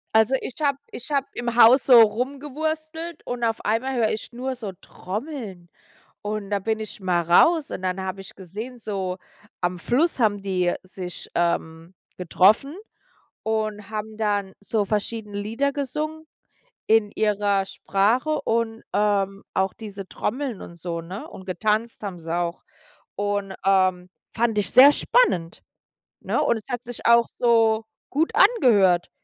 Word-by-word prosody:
Also 220 +4 +4
ich 255 - -6
habe, 280 -2 +2
ich 255 +5 -8
habe 275 -1 +1
im 240 -1 -3
Haus 245 +3 +7
so 245 -3 +9
rumgewurstelt 305 +8 -2
und 245 -1 -4
auf 225 -1 0
einmal 255 +5 0
höre 225 -3 +2
ich 215 - -5
nur 255 +2 -4
so 215 -5 -6
Trommeln. 205 - -7 0.5
Und 210 -1 -4
da 200 -1 0
bin 220 +2 -1
ich 215 -1 -7
mal 180 -2 +1
raus 285 - +4
und - - -5
dann 185 +1 -1
habe 190 +1 -5
ich 195 - -12
gesehen, 215 +7 -8
so 190 -4 -3 0.4
am 175 0 -1
Fluss 275 - +1
haben 210 -3 +2
die 180 -2 0
sich, 185 -1 -8
ähm, 170 0 -1 0.2
getroffen 200 - +3 0.7
und 215 -2 -2
haben 215 0 -5
dann 205 -3 -1
so 205 0 -1
verschiedene 210 0 -3
Lieder 230 +7 -1
gesungen 305 +3 -4 0.6
in 220 -2 +3
ihrer 205 -2 +1
Sprache 220 +10 0
und, 225 0 -1
ähm, 200 -1 0
auch 190 0 +1
diese 200 -3 -8
Trommeln 255 -1 -3
und 170 - -10
so, 170 0 -4
ne? 180 +5 -8
Und 190 - -12
getanzt 215 +5 -1
haben 190 -4 -5
sie 165 0 -5
auch. 175 -1 -2 0.5
Und, 205 -1 -2
ähm, 185 -2 +2 0.2
fand 225 -2 0
ich 200 -2 +1
sehr 275 +3 +9
spannend, 175 - +1 0.6
ne? - - 0
Und - - +2
es 220 - -6
hat 245 -1 -3
sich 245 0 -8
auch 235 0 +6
so 225 -2 +3 0.3
gut 315 +4 0
angehört. 215 - +4
215 Hz, 150 wpm, -24 LUFS, 190-245 Hz, 0.7 s, so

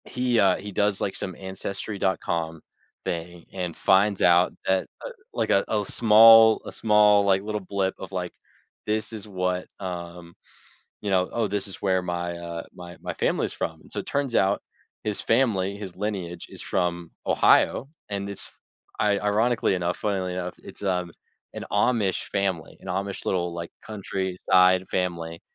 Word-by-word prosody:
He 125 -2 0
uh, 95 -3 +5
he 105 +1 -7
does 100 0 +1
like 95 - -1
some 95 -2 -4
Ancestry.com 95 -4 -3 0.4
thing 85 0 -5
and 90 -3 -4
finds 100 +1 +3
out 90 +1 +5
that, 95 0 +1 0.2
uh, - - -4 0.2
like, - - -1
a 100 - +4
a 105 -1 0
small 115 +1 +7
a - - -6
small, 105 -2 +4
like, 95 0 +3
little 105 0 -3
blip 95 0 -1
of 95 - -8
like, 90 -2 -3 0.6
"This 110 +1 -1
is 105 -2 -7
what" 90 -2 -2
um, 85 -2 -7 0.7
you 105 - -3
know, 90 -1 +2
"Oh, 115 -2 0
this 100 0 -3
is 95 - -7
where 95 -2 +1
my," 85 -1 -3
uh, 85 -1 -6
"my 90 -1 -10
my - - -5
family - - 0
is - - -7
from," - - -4
and - - -19
so - - -2
it - - -10
turns 140 -4 -1
out, 100 -1 +3 0.4
his 105 -2 -1
family, 105 -5 +1
his 100 -3 -8
lineage 95 -5 -4
is - - -9
from 85 -2 -1 0.2
Ohio, 135 - +4 0.2
and 100 -1 -3
it's 100 - -6 0.5
i 105 -1 +2
ironically 105 +1 +2
enough, 90 -1 -1
funnily 95 -3 -1
enough, 90 0 -4
it's, - - -11
um, 90 -3 -1 0.4
an - - -5
Amish 105 -2 +1
family, 95 -5 -2
an - - -11
Amish 100 +2 -3
little, 90 -2 0
like, 85 0 -5 0.2
countryside 95 -2 +2
family, 85 -2 -2
95 Hz, 165 wpm, -25 LUFS, 90-105 Hz, 0.7 s, small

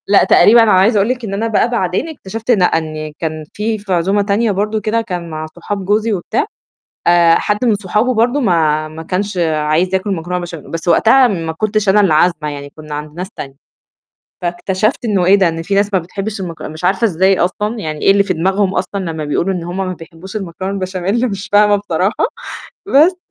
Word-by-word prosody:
لأ، 200 0 +5
تقريبًا 230 +2 +6
أنا 220 - +3
عايزة 195 +4 +4
أقول 200 +3 +2
لِك 250 -2 -2
إن 195 - -5
أنا 220 +3 -1
بقى 225 +1 +1
بعدين 210 - -1
اكتشفت 225 -5 -4
لأ، 195 -6 +4
إن 155 -2 -2
كان 155 -1 -4
في 220 +1 -2
في 200 -2 -4
عزومة 190 +4 +1
تانية 205 +2 +1
برضه 210 +3 -1
وكده 215 +2 0
كان 180 -5 -5
مع 155 0 -5
صحاب 195 +2 -5
جوزي 215 +3 +1
وبتاع 180 -4 -1 0.6
آآ، 170 -1 +5
حد 210 +6 0
من 230 -3 +3
صحابه 210 +5 0
برضه 240 +5 +2
ما 155 - +1
ما 155 +1 -9
كانش 195 +4 -3 0.2
عايز 155 +5 0
ياكل 190 +2 -1
مكرونة 180 +1 -3
بشام 170 -3 -8
بس 165 +1 -4
وقتها 245 +9 +5
ما 165 -6 -3
كنتش 215 +4 -1
أنا 200 +2 +5
اللي 190 -6 +3
عازمة 155 -1 +2
يعني 145 -1 -7
كنّا 155 -1 -8
عند 150 0 -6
ناس 185 +2 -5
تانية. 135 -9 -8 0.9
فاكتشفت 185 +8 -1
إنه 200 -5 +1
إيه 190 +2 +6
ده، 195 -3 +3
إن 165 0 -3
في 195 +4 -2
ناس 200 +1 +1
ما 190 - +3
بتحبّش 195 +5 -5
المك 170 -3 -7
مش 155 +2 -8
عارفة 195 +6 +2
إزاي 190 -1 +2
أصلًا 210 +5 -1
يعني 155 -5 -5
إيه - - +5
اللي 200 0 +4
في 195 -2 -1
دماغهم 190 +3 0
أصلًا 200 +2 -2
لمّا 155 -1 -5
بيقولوا 170 +6 0
إن 175 -2 -4
هم 175 +2 -5
ما 190 -1 -2
بيحبّوش 165 +3 -12
المكرونة 190 -1 -4
البشاميل 195 +5 -1
مش 195 -1 -6
فاهمة 205 0 +5
بصراحة. 200 - 0 0.6
بس 335 +4 +4
190 Hz, 210 wpm, -16 LUFS, 170-210 Hz, 0.9 s, تقريبًا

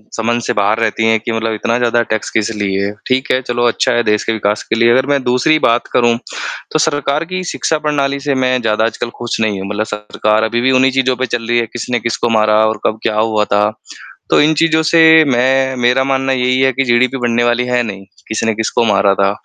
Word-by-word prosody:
समझ 115 +1 -1
से - - -1
बाहर 105 +2 +1
रहती 115 0 0
हैं 110 0 +2
कि 115 - -5
मतलब 115 0 -2
इतना 115 +2 -1
ज़्यादा 120 -1 +1
टैक्स 110 -1 -2
किस 110 0 0
लिए? 100 -1 -2 0.2
ठीक 130 0 0
है, 130 - +1
चलो 120 -1 -2
अच्छा 115 - 0
है 120 0 +1
देश 105 -1 0
के 115 - -1
विकास 105 -1 -1
के - - -2
लिए। 115 +1 +3
अगर 130 +2 +2
मैं 140 -1 +1
दूसरी 125 +6 +2
बात 120 -3 +1
करूँ 120 -1 +2 0.5
तो 155 - 0
सरकार 145 0 0
की 185 +1 -4
शिक्षा 165 -2 -2
प्रणाली 140 -2 0
से 140 -1 -1
मैं 130 -1 0
ज़्यादा 110 -1 0
आजकल 115 +1 -3
खुश 120 -1 -3
नहीं 105 -3 -1
हूँ। 95 - -6
मतलब 105 +1 -2
सरकार 105 +1 -1
अभी 120 +2 -1
भी 130 +2 +2
उन्हीं 130 0 +3
चीज़ों 130 -1 +1
पर 130 - -1
चल 115 -1 -4
रही 120 - +1
है, 115 - 0
किसने 120 +1 -3
किसको 115 +1 -2
मारा 110 -1 +2
और 110 0 -1
कब 110 0 -1
क्या 105 - -1
हुआ 110 -1 +1
था? 105 0 +1 0.7
तो - - +4
इन 155 +2 +3
चीज़ों 160 +1 +2
से 165 - +5 0.3
मैं 130 +1 +1
मेरा 125 +2 +2
मानना 135 0 0
यही 125 0 +1
है 135 0 +3
कि 135 +2 -1
जीडीपी 125 +2 +1
बढ़ने 120 -1 0
वाली 120 +1 +1
है 125 0 +1
नहीं, 100 -4 -7 0.2
किस 110 - -3
ने 115 -1 0
किसको 110 +2 -1
मारा 100 -2 +2
था। 100 0 +1
120 Hz, 240 wpm, -15 LUFS, 110-130 Hz, 0.7 s, से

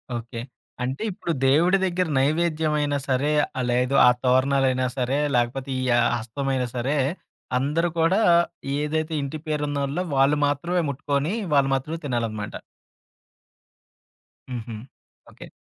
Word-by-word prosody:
Okay. 115 0 -6 0.4
అంటే 130 +2 -3
ఇప్పుడు 175 -2 -4
దేవుడి 165 +8 +4
దెగ్గర 180 -1 0
నైవేద్యమైనా 150 0 +1
సరే, 135 +3 +1 0.3
ఆ - - +1
లేదు 125 +2 +1
ఆ - - +9
తోరణాలైనా 130 0 +2
సరే, 130 +2 0 0.2
లేకపోతే 125 +3 0
ఈ - - -2
యా 120 - +4 0.2
హస్తమైనా 130 +3 -2
సరే, 130 +4 0 0.6
అందరూ 150 +6 0
కూడా 175 +6 +3 0.6
ఏదైతే 155 +2 -1
ఇంటి 140 +2 -4
పేరున్నోళ్ళో 145 +1 -1
వాళ్ళు 135 +2 +4
మాత్రమే 170 +5 0
ముట్టుకొని, 140 +4 -1 0.2
వాళ్ళు 140 -1 +4
మాత్రమే 150 +5 -4
తినాలనమాట. 115 -5 -3 1.9
హుహు. 120 -2 -5 0.6
ఓకే. - - -12
140 Hz, 115 wpm, -24 LUFS, 130-155 Hz, 1.9 s, ఆ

